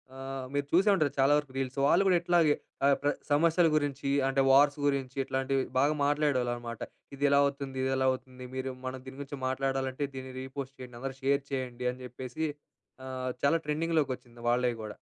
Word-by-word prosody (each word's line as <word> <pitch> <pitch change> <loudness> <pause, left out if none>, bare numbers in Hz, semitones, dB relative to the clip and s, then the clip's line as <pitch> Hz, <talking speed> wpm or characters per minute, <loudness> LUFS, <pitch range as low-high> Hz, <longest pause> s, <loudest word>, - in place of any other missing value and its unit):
ఆహ్, 135 0 -5
మీరు 145 0 0
చూసే 195 +5 +5
ఉంటారు 155 -6 +1
చాలా 135 +2 +5
వరకు 145 -3 -3
రీల్స్. 135 +1 -3
వాళ్ళు 180 +6 +5
గూడా 180 -2 +5
ఇట్లాగే 170 -4 +4 0.3
ఆహ్, 140 -1 +5
ప్ర 145 - +2 0.2
సమస్యల 165 +3 +4
గురించి, 140 -2 -1 0.2
అంటే 135 0 +2
వార్స్ 145 +2 +5
గురించి, 135 -2 -1
ఇట్లాంటివి 135 0 0 0.2
బాగా 145 +3 +4
మాట్లాడేవాళ్ళనమాట. 125 -6 0 0.4
"ఇదెలా 140 0 +4
అవుతుంది? 140 -1 -3
ఇదెలా 130 0 +1
అవుతుంది? 130 0 -7
మీరు 130 0 -3
మనం 130 0 -4
దీని 130 +1 -9
గురించి 140 0 -7
మాట్లాడాలంటే 135 +1 -1
దీన్ని 130 0 -7
రీ 130 - -5
పోస్ట్ 135 0 -5
చేయండి. 125 -2 -9
అందరూ 135 0 -4
షేర్ 140 +1 +3
చేయండి." 125 -2 -3
అని 130 +1 -11
జెప్పేసి 130 +5 -5 0.6
ఆహ్, 130 -1 -3
చాలా 165 +4 +4
ట్రెండింగ్‌లోకొచ్చింది 150 -6 -1
వాళ్ళయి 120 -1 +1
గూడా. 105 - -7
135 Hz, 170 wpm, -30 LUFS, 130-145 Hz, 0.6 s, చూసే